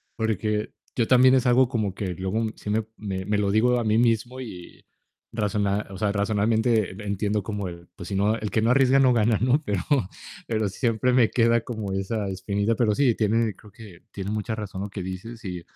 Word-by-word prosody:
porque 110 -1 -1 0.2
yo 115 -4 +1
también 130 +1 +6
es 130 -1 +2
algo 125 +1 +5
como 110 -6 -1
que 95 -2 -4
luego 100 +4 -1
sí - - -8
me 110 +1 0
me 95 -3 -4
me 105 +1 0
lo 100 -1 +1
digo 120 +4 +3
a - - -1
mí 110 0 +2
mismo 120 +2 +1
y 90 -8 -10 0.5
razona, 105 -2 -1
o 95 - -7
sea, 105 0 0
racionalmente 110 +1 +1 0.2
entiendo 105 +1 -1
como 100 -1 -4
el, 85 0 -11
pues 90 -4 -9
si 100 - -3
no 105 +3 +2
el 110 -2 -4
que 110 - +1
no 115 - +2
arriesga 135 +1 +4
no 130 -2 +5
gana, 115 -1 +3
¿no? 130 +5 +2
Pero 100 -8 -1 0.7
pero 110 -2 0
siempre 115 +4 0
me 125 -3 +4
queda 115 -1 +3
como 110 -6 -5
esa 100 +2 -2
espinita. 100 +3 -1
Pero 110 -3 +1
sí, 130 -3 +3
tiene 110 0 +1
creo 105 - -17
que 100 -5 -14
tiene 100 0 -5
mucha 110 +1 -2
razón 100 -3 -6
lo 100 - -4
que 100 0 -6
dices 105 +6 -7
y 90 -2 -5
110 Hz, 210 wpm, -25 LUFS, 100-115 Hz, 0.7 s, también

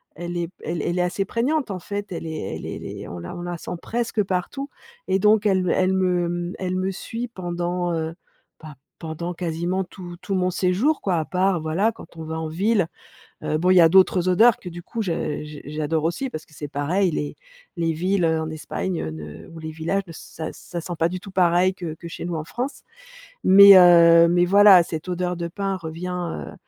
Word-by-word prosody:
elle 175 +1 -5
est 170 -1 -2
elle 165 -1 -3
est - - -2
elle 175 - -2
est - - +3
assez 180 +2 -1
prégnante, 265 +5 -1
en 185 - -4
fait, 205 +2 -6
elle 165 - -5
est 155 -11 -4
elle - - -8
es - - -5
elle - - -9
est - - -7
on 85 - -7
la 85 - -7
on 175 - -6
la 175 0 -4
sent - - -7
presque 230 -2 -1
partout 195 +10 -3 0.4
et 190 - +2
donc, 210 +1 +4
elle 190 -2 +2
me 180 - 0
elle 185 0 +2
me, 180 -2 +1
mmh, 175 +1 -3
elle 185 -1 -2
me 185 +1 -1
suit 230 +5 -5
pendant, 175 -2 -3
heu, 160 0 -2 0.5
bah 155 -2 -10 0.2
pendant, 165 +2 -5
quasiment, 175 +2 -2
tout 180 -1 -10
tout 195 +1 -3
mon 185 0 +1
séjour, 190 - +1
quoi, 180 -4 0
à 155 - -1
part, 185 +1 +1
voilà, 180 +8 +1
quand 165 - -14
on 160 - -6
va 160 +1 -4
en 160 - -3
ville. 195 +3 +1 0.6
Heu, 155 - 0
bon 180 +3 +2
il 185 - +5
y 180 - +8
a 165 - +7
d'autres 185 0 +4
odeurs 220 +5 +5
que, 180 - -8
du 175 +1 -9
coup, 230 - -6
je 165 -6 -2
j 150 -1 -10
j'adore 155 +1 -2
aussi, 175 +11 -1
parce 155 - -7
que - - -25
c'est 145 -1 -6
pareil, 170 +7 0
les 145 -1 -3 0.4
les 165 -1 +1
villes, 180 +3 0
heu, 160 0 +1
en 160 0 -4
Espagne 165 +3 -4
ne 75 -1 -9
ou 165 - -11
les 160 - -6
villages, 165 +5 -1
ça 160 0 -7
ça 175 -1 -7
sent 175 - -6
pas 165 - +2
du 185 - -4
tout 195 - -11
pareil 180 0 +3
que 170 -5 -6
que 170 +1 -10
chez 170 - -7
nous, 175 - -3
en 155 - -4
France. 250 - -5 0.6
Mais 200 +1 +9
heu, 170 -2 +7
mais 175 0 +3
voilà 195 -1 +7
,cette 165 +1 -6
odeur 180 0 -1
de 170 -1 -3
pins 195 +1 -2
revient, 170 - -5
heu, - - -9
175 Hz, 230 wpm, -23 LUFS, 165-190 Hz, 0.6 s, Mais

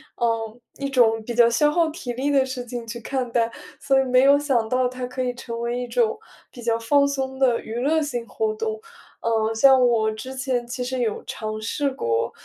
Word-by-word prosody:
呃， 230 -1 -1 0.2
一 275 0 -2
种 230 -4 +3
比 235 +2 -5
较 240 0 +6
消 265 +6 +3
耗 330 +1 +2
体 285 -6 -6
力 270 +4 -1
的 275 -2 +4
事 255 -2 -5
情 240 -1 -6
去 235 +1 -6
看 250 +1 -3
待， 230 -1 +1 0.3
所 270 0 +3
以 - - +1
没 255 0 +4
有 280 +1 +6
想 265 -6 +1
到 255 +2 +1
它 255 0 -5
可 250 +1 -5
以 250 -1 -2
成 235 -1 -6
为 235 +1 -2
一 245 - -4
种， 455 - +1 0.3
比 240 - -11
较 230 0 +1
放 280 +5 +3
松 265 -1 -3
的 250 -3 +2
娱 220 - -7
乐 310 +5 +2
性 245 -6 -3
活 435 -1 -2
动。 440 0 -3 0.4
呃， 225 -1 +1
像 260 +1 +6
我 220 -2 +2
之 235 +5 -7
前 260 -2 -1
其 250 +1 -4
实 255 +1 -3
有 225 -3 -1
尝 215 0 -5
试 280 +6 -1
过， 115 - -1
250 Hz, 235 characters per minute, -23 LUFS, 230-275 Hz, 0.4 s, 较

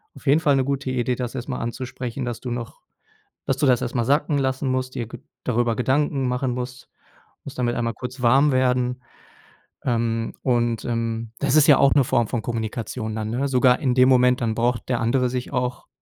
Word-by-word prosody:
auf - - -15
jeden 145 +2 +4
Fall 145 -3 +3
'ne 135 -1 +1
gute 140 -1 -2
Idee, 125 -1 0
das 125 +1 -5
erst 125 +1 -5
mal 125 - -3
anzusprechen, 125 +1 -5
dass 120 -2 -4
du 125 - -6
noch 120 -1 -6 0.7
dass 135 - +1
du 150 - 0
das 125 -3 +4
erst 120 - -4
mal 120 -2 +1
sacken 145 +3 +1
lassen 130 0 -1
musst, 130 0 -2
dir 120 - -3
ge - - -10 0.2
darüber 120 -2 +1
Gedanken 135 +1 +1
machen 125 +1 -1
musst 125 0 -6 0.5
musst 135 - -9
damit 120 -1 0
einmal 115 -1 -1
kurz 125 +4 -7
warm 135 +5 +5
werden. 125 -1 +1 0.8
Ähm, 115 -1 -1
und, 120 -3 0
ähm, 115 -1 -2
das 135 - +1
ist 155 -2 +6
ja 145 - +7
auch 135 - +5
'ne 140 - +5
Form 120 -3 +1
von 120 0 -2
Kommunikation 110 0 -4
dann, 110 -1 -3
ne? 130 +5 -1
Sogar 125 -1 +3
in 130 -3 0
dem 130 0 +5
Moment, 125 0 +4
dann 115 -2 0
braucht 120 +1 -1
der 120 -2 +1
andere 125 +2 +1
sich 125 +2 -4
auch 125 -1 -2
125 Hz, 210 wpm, -23 LUFS, 120-130 Hz, 0.8 s, ja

